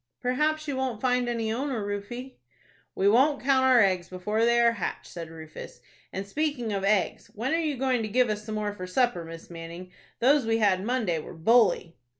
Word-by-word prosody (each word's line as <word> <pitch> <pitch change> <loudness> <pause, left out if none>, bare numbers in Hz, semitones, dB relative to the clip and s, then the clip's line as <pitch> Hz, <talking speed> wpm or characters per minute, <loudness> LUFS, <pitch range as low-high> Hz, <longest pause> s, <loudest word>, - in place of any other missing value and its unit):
"Perhaps 300 +5 0
you 285 - -2
won't 260 -4 -2
find 250 -1 +1
any 225 -2 -1
owner, 250 -4 -2
Rufie." 240 +6 -6 0.6
"We 195 - +2
won't 270 +7 +4
count 265 -1 +3
our 255 -2 +6
eggs 185 -3 +2
before 210 +5 -1
they 235 0 +4
are 235 0 +5
hatched," 230 -6 -4
said 165 -2 -8
Rufus, 160 -1 -10 0.3
"and 195 +1 -4
speaking 250 -1 -2
of 195 -1 -2
eggs, 200 -1 0
when 240 +8 -1
are 330 - +2
you 305 -4 -1
going 255 -2 +1
to 220 - -2
give 250 +3 +3
us 210 -1 -3
some 215 0 -5
more 210 -1 -2
for 185 -2 -7
supper, 240 -3 +1
Miss 165 +1 -10
Manning? 170 +2 -9 0.3
Those 270 0 +3
we 225 0 +2
had 195 -4 +2
Monday 220 -8 0
were 155 - -9
bully." 180 -2 +3
225 Hz, 200 wpm, -27 LUFS, 195-255 Hz, 0.6 s, our